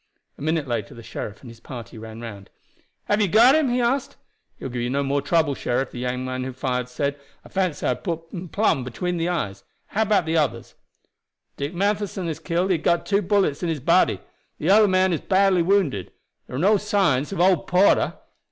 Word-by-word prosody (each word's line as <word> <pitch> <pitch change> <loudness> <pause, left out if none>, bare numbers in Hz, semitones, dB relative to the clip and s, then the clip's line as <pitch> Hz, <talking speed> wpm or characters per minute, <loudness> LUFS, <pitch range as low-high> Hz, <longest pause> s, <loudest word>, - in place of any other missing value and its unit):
A - - -16
minute 155 -1 0
later 115 -4 -3
the 115 - -11
sheriff 110 -2 -7
and 125 - -11
his 115 - -15
party 120 -3 -9
ran 110 +1 -9
round. 100 -4 -9 0.5
"Have 205 +1 +1
you 205 - +3
got 230 +8 +6
him?" 310 -3 +3
he 245 +1 +1
asked. 250 +3 0 0.4
"He - - -9
will 130 - -4
give 120 0 -2
no 140 +1 0
more 140 +1 0
trouble, 155 0 +2
sheriff," 130 0 -2
the 120 - -7
young 125 +1 -2
man 130 0 -3
who 130 0 -5
fired 125 -1 -2
said. 140 +3 -2 0.3
"I - - -13
fancy 185 -5 -1
I - - +2
had - - -3
him 170 +1 -5
plum 200 -10 +1
between 175 +9 -3
the 165 +1 0
eyes. 100 - -3 0.3
How 215 - -1
about 210 -5 +2
the 160 +1 0
others?" 150 -5 -1 0.8
"Dick 145 +5 -4
Matheson 200 -1 -1
is 160 -1 -4
killed; 175 +3 0
he 175 - +2
got 170 +2 +1
two 200 0 +2
bullets 195 -6 +1
in 175 - -1
his 160 -2 -1
body. - - +3 0.4
The 165 +5 +1
other 210 +1 +6
man 185 -1 +3
is 160 - -2
badly 190 -2 +3
wounded. 170 - +1 0.4
There - - -7
are - - -2
no 205 +6 +4
signs 195 - +1
of 195 - -4
old 180 -2 +3
Porter." 185 +3 +3
165 Hz, 215 wpm, -23 LUFS, 130-195 Hz, 0.8 s, got